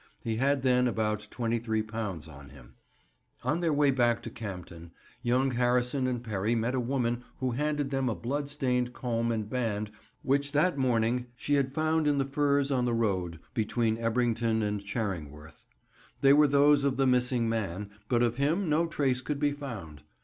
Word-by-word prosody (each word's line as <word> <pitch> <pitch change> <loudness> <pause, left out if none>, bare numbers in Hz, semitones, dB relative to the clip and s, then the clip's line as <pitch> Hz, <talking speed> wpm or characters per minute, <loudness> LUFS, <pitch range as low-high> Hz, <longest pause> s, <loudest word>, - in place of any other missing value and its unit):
He 110 -1 -2
had 135 +2 +1
then 125 -1 +3
about 105 -2 -1
£23 110 -7 -2
on 70 -2 -12
him. 65 -2 -15 0.7
On 155 - 0
their 170 -2 +1
way 145 -1 +3
back 120 -3 +2
to - - -6
Campden, 90 -6 -8 0.3
young 130 +2 +2
Harrison 125 +2 +1
and 125 -2 -2
Perry 110 0 -1
met 115 +2 0
a 130 - +1
woman 120 -1 -1
who 130 -1 -1
handed 145 +2 -1
them 135 -2 0
a 110 - -1
bloodstained 130 -2 -1
comb 115 -2 -1
and 110 -2 -2
band 105 -3 -2 0.3
which 140 +1 +1
that 155 +5 +3
morning 125 -2 +1
she 145 - -2
had 140 -2 +2
found 155 +1 +1
in 145 -1 +2
the 135 - +1
furze 140 0 +1
on 125 -2 +1
the 120 -1 +1
road 95 -7 -1
between 110 0 0
Ebrington 115 -1 +1
and 105 -1 -2
Charingworth. 80 -8 -5 0.5
They 140 0 +7
were 150 +1 +6
those 145 0 +4
of 140 -2 +1
the 135 - +3
missing 125 -2 +2
man, 105 -3 -3 0.2
but 120 -1 +3
of 120 0 0
him 160 +7 +1
no 160 +2 +2
trace 135 -5 0
could 145 +2 -3
be 145 -1 +2
found. 115 - -7
125 Hz, 175 wpm, -29 LUFS, 110-140 Hz, 0.7 s, They